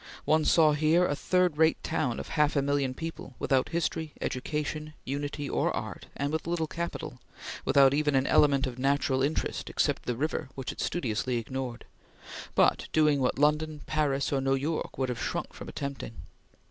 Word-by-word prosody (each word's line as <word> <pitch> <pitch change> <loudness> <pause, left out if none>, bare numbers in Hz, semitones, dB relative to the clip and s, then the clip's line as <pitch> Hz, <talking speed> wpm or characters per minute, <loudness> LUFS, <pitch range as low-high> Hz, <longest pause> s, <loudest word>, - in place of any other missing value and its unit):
One 155 0 +3
saw 155 -2 +5
here 155 +4 +3
a 145 - 0
third 180 -1 +1
rate 160 0 +4
town 145 -7 -1
of - - -7
half 150 -1 +2
a 140 - +2
million 140 -2 0
people 165 -5 -7
without 135 -1 +1
history, 160 -2 -2
education, 150 +3 -3
unity, 145 +1 -3
or - - +1
art, - - -6
and 140 +1 -1
with 160 +1 -2
little 170 -1 0
capital 170 +2 -5 0.4
without 135 -1 +5
even 145 -1 +2
an 135 0 +3
element 140 -1 +4
of 125 -1 -5
natural 135 0 +1
interest 145 +4 -1
except - - 0
the 125 - 0
river 145 -1 -2
which 135 -2 -4
it - - -7
studiously 125 -5 -1
ignored 125 +1 -5 0.7
but - - +3
doing 150 -2 +4
what 125 -1 +1
London, 150 +1 +1
Paris, 145 -3 0
or 135 - +1
New 135 0 +2
York 150 +4 -3
would 130 -1 0
have 120 -2 -3
shrunk - - -3
from - - -9
attempting. 140 -4 -5
145 Hz, 175 wpm, -29 LUFS, 135-155 Hz, 0.7 s, saw